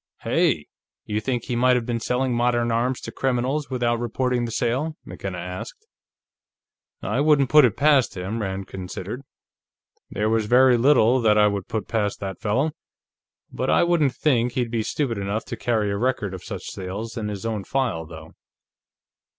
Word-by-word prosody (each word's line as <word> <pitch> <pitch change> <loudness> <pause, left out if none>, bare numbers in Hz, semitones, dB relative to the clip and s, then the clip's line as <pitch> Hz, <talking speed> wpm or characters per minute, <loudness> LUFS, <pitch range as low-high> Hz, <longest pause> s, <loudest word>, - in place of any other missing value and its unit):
"Hey! - - +1 0.4
You 105 0 -2
think 120 +2 -2
he 125 - -3
might 125 +1 +4
have 120 -2 0
been 120 -1 -2
selling 125 +2 0
modern 120 0 +1
arms 120 +3 0
to - - -7
criminals, 135 +3 -1
without 120 -3 0
reporting 120 +1 -1
the 115 - -5
sale?" 130 +8 -1
McKenna 95 -2 -6
asked. 90 +1 -7 1.2
"I 135 - 0
wouldn't 145 -3 +3
put 150 -3 +8
it 115 - 0
past 140 -7 +3
him," 100 +6 -3
Rand 95 -1 -3
considered. 95 +6 -6 0.9
"There 105 +1 -1
was 110 -1 +1
very 125 +2 +6
little 125 -1 +4
that 105 -2 +4
I 105 - +6
would 100 -2 -1
put 110 -3 -3
past 105 -3 -1
that 95 -2 -6
fellow. 130 +9 +1 0.8
But - - -2
I - - +4
wouldn't 165 -6 +2
think 125 -5 +1
he'd 120 -3 -1
be 115 -2 0
stupid 115 -1 -2
enough 100 +3 -2
to - - -5
carry 110 -4 0
a 100 - -1
record 110 -4 -1
of 95 - -8
such - - -6
sales 100 +5 -6
in 110 -3 -3
his 105 0 -5
own 110 -3 -2
file, 115 - -1
though." 80 -1 -11
120 Hz, 175 wpm, -23 LUFS, 105-130 Hz, 1.2 s, put